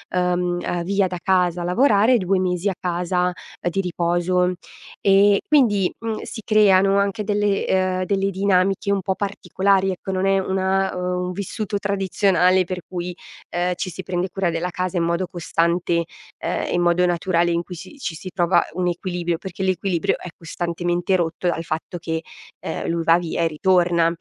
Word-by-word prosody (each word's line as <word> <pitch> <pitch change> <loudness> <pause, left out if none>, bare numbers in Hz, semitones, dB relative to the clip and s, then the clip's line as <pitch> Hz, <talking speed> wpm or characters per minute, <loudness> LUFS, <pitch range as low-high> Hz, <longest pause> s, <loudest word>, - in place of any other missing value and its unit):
uhm, 180 0 +1
ehm, 175 -1 -2
via 195 +1 +1
da 180 0 -5
casa 180 -2 +2
a - - -3
lavorare, 220 +3 +4
2 190 -1 +1
mesi 180 +1 0
a 195 - -1
casa 180 0 0 0.4
di 195 +3 -1
riposo. 180 +1 0 0.5
E 200 0 +5
quindi, 215 -11 +3
mhmm, 225 -1 -3
si 220 - -7
creano 195 -2 +4
anche 200 +1 0
delle, 205 -1 0
ehm 185 -1 +1
delle 195 +1 0
dinamiche 195 +1 +1
un 200 -1 +1
po' 190 +1 -1
particolari, 195 -1 0
ecco, 190 +1 -5
non 185 0 0
è 195 0 +3
una, 190 0 0
ehm 180 0 -2
un - - -3
vissuto 205 +2 -3
tradizionale 190 -2 +2
per 180 0 -5
cui, 180 -1 -5 0.3
ehm, 180 +1 0
ci 185 - -3
si 190 - -7
prende 180 0 -2
cura 190 -1 -1
della 165 +2 -2
casa 185 0 -3
in 170 - +1
modo 170 +2 0
costante, 170 -1 0 0.3
ehm, - - -2
in 175 - +2
modo 175 +1 +3
naturale, 175 0 +1
in 170 0 0
cui 180 - -9
si 175 - -11
ci 175 -9 -4
si 185 +3 -8
trova 175 -1 +3
un 180 0 -1
equilibrio, 175 -1 -2
perché 190 +1 -6
l'equilibrio 185 -2 0
è 180 - -8
costantemente 175 +2 -1
rotto 170 0 -1
dal 170 -1 0
fatto 165 +2 -4
che, 160 -1 -3 0.4
ehm, - - -4
lui 165 0 -1
va 165 +1 +5
via 170 -1 -3
e - - +3
ritorna. 170 +1 +2
180 Hz, 180 wpm, -22 LUFS, 175-195 Hz, 0.5 s, E